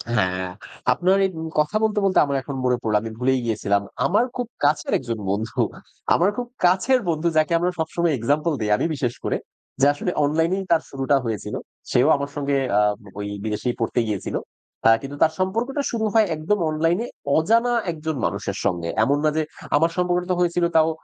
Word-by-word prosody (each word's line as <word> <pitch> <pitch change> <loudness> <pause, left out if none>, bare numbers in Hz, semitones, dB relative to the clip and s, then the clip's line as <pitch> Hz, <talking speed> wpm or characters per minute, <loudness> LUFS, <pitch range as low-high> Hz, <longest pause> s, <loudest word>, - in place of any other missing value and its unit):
হ্যাঁ, 95 -2 0 0.4
আপনার 180 +8 +2
এই - - +1
উ - - -4 0.2
কথা 150 +7 +2
বলতে, 215 -1 +2
বলতে 190 - +3
আমার 140 -1 -2
এখন 140 +1 -6
মনে 125 -1 +2
পড়ল। 110 -2 0
আমি 115 - -6
ভুলেই 130 +1 +2
গিয়েছিলাম। 100 -3 +1 0.2
আমার 205 +5 +3
খুব 245 -2 -2 0.2
কাছের 145 +1 +2
একজন 115 -4 -4
বন্ধু, 105 +3 -2 0.5
আমার 180 +3 +4
খুব 245 0 -3 0.2
কাছের 190 +9 +4
বন্ধু 160 +1 0
যাকে 155 +1 +3
আমরা 180 +1 +1
সবসময় 160 +1 0
এক্সাম্পল 145 +7 +1
দেই 105 - 0
আমি - - -1
বিশেষ 125 -4 -1
করে। - - 0 0.4
যে, 140 - +6
আসলে 180 +5 -2
অনলাইনেই 165 +6 +1
তার 165 -1 +4
শুরুটা 135 0 +1
হয়েছিল। 110 -4 -3 0.4
সেও 125 +3 +4
আমার 140 0 -3
সঙ্গে 140 -1 0 0.2
আ - - +5 0.4
ঐ - - -2 0.2
বিদেশেই 110 +3 -2
পড়তে 115 +1 0
গিয়েছিল। 100 -3 -3 0.7
কিন্তু 140 +1 -7
তার 160 0 +3
সম্পর্কটা 230 +10 -1
শুরু 225 -2 -1
হয় 220 -2 +5
একদম 165 +7 0
অনলাইনে 165 +8 +1 0.3
অজানা 230 +9 +3 0.2
একজন 160 -1 -4
মানুষের 100 -1 -3
সঙ্গে। 85 -4 0
এমন 140 +5 +2
না 155 - +4
যে, - - +3 0.3
আমার 165 +3 +4
সম্পর্কটা 180 0 +1
তো - - +2
হয়েছিল 175 0 +2
তাও 160 0 +5
155 Hz, 185 wpm, -23 LUFS, 125-180 Hz, 0.7 s, যে